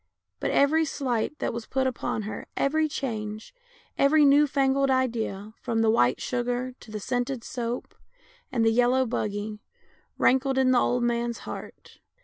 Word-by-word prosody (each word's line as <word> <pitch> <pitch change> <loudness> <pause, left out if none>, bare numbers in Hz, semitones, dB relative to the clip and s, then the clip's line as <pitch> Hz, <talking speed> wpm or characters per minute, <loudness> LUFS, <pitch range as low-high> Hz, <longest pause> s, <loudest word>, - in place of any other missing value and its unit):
But - - -1
every 310 +3 +3
slight 270 -2 -2
that - - -2
was 230 -1 -6
put 265 0 0
upon 245 -4 -2
her, 215 - -6
every 310 +2 +1
change, 220 - -5 0.5
every 295 +2 +5
new 285 +1 +6
fangled 275 0 +2
idea, 225 -5 -1
from 225 -1 0
the 220 - +4
white 125 - +3
sugar 245 +1 -2
to - - -15
the 215 0 -5
scented 245 +2 -2
soap 240 0 -4 0.6
and 235 -3 +1
the 225 - +5
yellow 245 +3 +3
buggy, 210 -2 -3 0.6
rankled 265 +1 +2
in 260 -1 +4
the 250 - +5
old 245 0 +1
man's 235 0 -1
heart. - - -9
245 Hz, 155 wpm, -26 LUFS, 225-270 Hz, 0.6 s, new